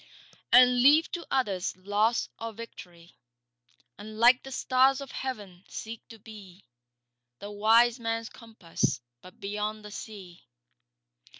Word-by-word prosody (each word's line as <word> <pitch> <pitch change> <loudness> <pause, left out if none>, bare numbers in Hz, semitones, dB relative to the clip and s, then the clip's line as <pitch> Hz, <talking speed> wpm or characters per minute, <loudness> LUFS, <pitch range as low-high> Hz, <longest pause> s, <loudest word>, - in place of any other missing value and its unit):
And 250 0 +6
leave 295 +5 +5
to 345 - -6
others 200 -10 -1
loss 205 +5 0
or 230 0 -6
victory; 180 -6 -12 0.8
And 215 +1 -10
like 240 +3 +5
the 270 - -11
stars 260 +1 +2
of 275 -2 -8
heaven 205 -9 -6
seek 225 0 -8
to 225 - -13
be 205 -3 -14 0.7
The 205 +8 -9
wise 225 +4 +3
man's 230 0 -3
compass 195 - -3 0.2
but 185 - -16
beyond 210 +1 -4
the 210 - -9
sea. 195 -5 -10
220 Hz, 125 wpm, -28 LUFS, 200-240 Hz, 0.8 s, And